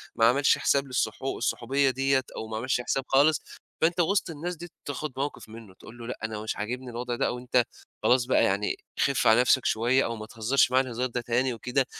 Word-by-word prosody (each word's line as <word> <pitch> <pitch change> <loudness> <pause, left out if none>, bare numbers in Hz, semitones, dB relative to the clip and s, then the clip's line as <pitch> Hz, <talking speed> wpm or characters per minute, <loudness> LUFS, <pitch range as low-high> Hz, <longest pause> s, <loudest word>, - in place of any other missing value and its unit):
ما 115 - +4
عملش 135 +5 +4
حساب 140 0 +1
للصح 125 -1 -2
الصحوبية 135 +1 0
دِيّة 135 +1 +1
أو 110 - -5
ما 110 0 -4
عملش 125 +1 0
حساب 135 +2 -1
خالص، 145 +2 +4 0.4
فأنت 170 +2 +2
وِسط 195 +2 +1
الناس 170 +3 -5
دي 175 +2 -9
ت - - -26
تاخُد 145 0 -4
موقِف 140 -5 -4
منُّه، 110 -4 -12
تقول 115 +5 -14
له 115 0 -8
لأ، 125 - -5
أنا 110 -1 -3
مش 110 - -3
عاجبني 125 +4 -4
الوضع 120 +1 -4
ده - - 0
أو 125 - -3
أنت 125 0 +2 0.4
خلاص 125 -1 +4
بقى 130 - +3
يعني 100 +2 +1 0.2
خِف 135 -3 +2
على 110 +2 +6
نَفْسك 130 +1 +3
شوية 120 +4 +2
أو 115 - -3
ما 110 -1 -7
تهزّرش 115 +4 +1
معايا 130 +1 +3
الهزار 125 0 -3
ده 125 0 -3
تاني 120 +2 0
وكده، 125 +3 -1
125 Hz, 220 wpm, -27 LUFS, 115-135 Hz, 0.4 s, على